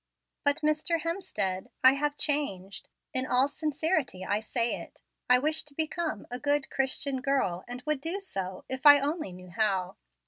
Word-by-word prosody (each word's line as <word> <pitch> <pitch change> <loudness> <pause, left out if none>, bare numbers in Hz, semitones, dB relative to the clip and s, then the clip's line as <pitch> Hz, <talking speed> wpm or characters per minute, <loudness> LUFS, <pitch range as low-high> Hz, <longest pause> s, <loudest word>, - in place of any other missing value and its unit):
But, 285 +2 +1
Mr. 305 +2 +1
Hemstead, 305 - -3
I 260 +1 +8
have 290 +1 -1
changed. 200 - -1 0.3
In 260 0 0
all 255 +2 +3
sincerity 300 - -1
I 205 +2 +1
say 230 +2 0
it, - - -14 0.3
I 250 - +8
wish 305 +4 +2
to 290 -1 -12
become 315 -5 -2
a 245 - -3
good, 290 -1 0
Christian 270 0 0
girl, 265 -11 0
and 245 +1 -7
would 305 -3 0
do 335 +6 -3
so, 190 - -5
if 260 +2 +1
I 290 0 +10
only 295 - -2
knew 180 0 -12
how. 195 -3 0
275 Hz, 170 wpm, -29 LUFS, 220-305 Hz, 0.3 s, I